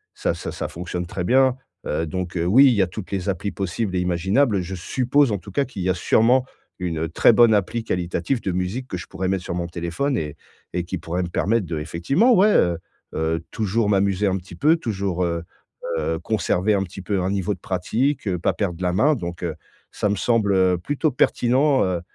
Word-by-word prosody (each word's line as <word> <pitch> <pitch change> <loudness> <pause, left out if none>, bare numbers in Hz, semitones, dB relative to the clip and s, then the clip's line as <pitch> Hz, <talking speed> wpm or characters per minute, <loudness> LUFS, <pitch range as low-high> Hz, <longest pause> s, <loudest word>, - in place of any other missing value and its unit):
ça - - -1
ça - - -6
ça - - -4
fonctionne 90 +1 -5
très 90 +1 -4
bien, 130 +4 +4 0.3
heu, 80 +2 -1
donc, 90 +1 -4
heu, 85 - 0
oui, 125 +10 +6
il 130 - +6
y 105 - +2
a 95 - +2
toutes 95 +1 -8
les 95 0 -2
applis 100 +1 -2
possibles 95 +1 -3
et - - +1
imaginables. 95 +5 +1
Je 90 +2 -6
suppose 130 +8 +1
en 100 - 0
tout 100 - -12
cas 140 +8 +1
qu'il 105 -8 -6
y 95 - 0
a 90 - +3
sûrement 120 +8 +3 0.3
une 80 -3 -2
très 85 - +4
bonne 115 0 +6
appli 105 +3 0
qualitative 90 +7 -2
de 95 - -2
musique 95 +9 -3
que 90 - -4
je 80 - -7
pourrais 95 - -4
mettre 95 -1 -1
sur - - -4
mon 85 -1 -2
téléphone 85 +11 -2
et 75 -4 -4 0.4
et 90 - -1
qui 95 +2 -4
pourrait 85 +3 -3
me 85 - -4
permettre 100 +1 0
d'effectivement 85 - +1
ouais, 210 +1 +5
heu 85 -1 +3 0.4
heu, 80 +1 0
toujours 110 0 0
m'amuser 100 0 +2
un 95 -1 +2
petit 90 0 -11
peu, 155 +4 +3
toujours, 100 - -2
heu 85 -1 -2 0.5
heu, 80 +1 -1
conserver 105 +1 0
un 95 - +1
petit 95 +1 -9
peu 95 0 -1
un 95 +2 -1
niveau 100 +1 -1
de - - -23
pratique, 115 +9 -1
heu, 90 -2 0
pas - - +1
perdre 90 -3 -3
la 90 0 +1
main 145 +10 +3
donc, 85 -6 -6
heu, 80 -3 -2 0.4
ça 105 - -1
me 100 - +1
semble, 105 -1 +1
heu, 95 -1 +3
plutôt 145 - -1
pertinent, 130 +3 +2
heu, 90 -2 -1
95 Hz, 220 wpm, -22 LUFS, 90-115 Hz, 0.5 s, oui